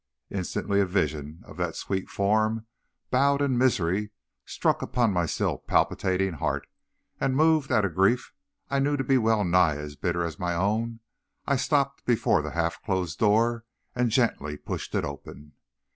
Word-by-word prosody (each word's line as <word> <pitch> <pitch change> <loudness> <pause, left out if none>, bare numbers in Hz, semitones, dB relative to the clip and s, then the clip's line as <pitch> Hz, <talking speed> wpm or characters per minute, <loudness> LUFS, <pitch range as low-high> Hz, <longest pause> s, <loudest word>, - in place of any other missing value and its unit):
Instantly 100 +1 -1
a - - +3
vision 75 -3 -2
of - - -13
that - - -2
sweet 95 -1 -3
form 110 +2 +1 0.5
bowed 140 +2 +3
in 140 -3 +1
misery 105 -5 +1 0.4
struck - - 0
upon 120 -4 +1
my 85 -2 +1
still - - -1
palpitating 95 0 +1
heart; 75 - -2 0.5
and 135 -1 0
moved 155 -1 +3
at 110 -5 +3
a - - +2
grief 95 +8 +1 0.3
I 140 - 0
knew 145 +1 +1
to 135 - -1
be 135 0 +3
well 110 -2 +2
nigh 90 -3 +3
as 75 0 -7
bitter 85 +2 -1
as 80 -3 -5
my 90 -1 -1
own, 110 +5 -1 0.4
I 140 - +2
stopped 140 0 0
before 120 -4 +2
the - - -5
half 85 0 -1
closed 95 -4 -2
door, 115 +2 +3 0.3
and 125 -1 +1
gently 105 - 0
pushed - - -5
it - - +1
open. 70 +1 -9
105 Hz, 165 wpm, -26 LUFS, 85-125 Hz, 0.5 s, a